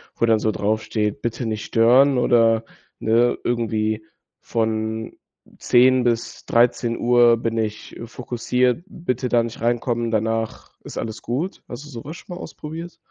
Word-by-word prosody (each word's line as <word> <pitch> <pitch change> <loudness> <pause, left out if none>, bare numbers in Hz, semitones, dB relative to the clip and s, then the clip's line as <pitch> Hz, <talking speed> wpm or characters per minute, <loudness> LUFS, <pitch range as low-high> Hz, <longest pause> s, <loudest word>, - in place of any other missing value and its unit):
wo 115 - +2
dann 110 -1 +3
so 110 - +1
draufsteht, 105 0 -1
„Bitte 120 +1 -3
nicht 110 -1 -3
stören“, 125 +4 +4
oder 115 -2 +3 0.3
ne, 115 +2 +2
irgendwie 110 -2 -1 0.4
„Von 110 0 -2 0.4
10:00 125 +1 +4
bis 120 -1 -2
13:00 120 0 +3
bin 115 0 -2
ich 110 -1 -4
fokussiert, 125 +4 -1
bitte 125 - -3
da 120 -1 +3
nicht 115 -1 -7
reinkommen, 120 0 0
danach 110 +1 -2
ist - - -9
alles 110 -1 -5
gut.“ 145 +11 -3
Hast 130 +4 -7
du - - -12
so 115 -4 -8
was 160 +5 -8
schon 175 - -9
mal - - -8
ausprobiert? 165 +3 -8
115 Hz, 145 wpm, -22 LUFS, 110-125 Hz, 0.4 s, stören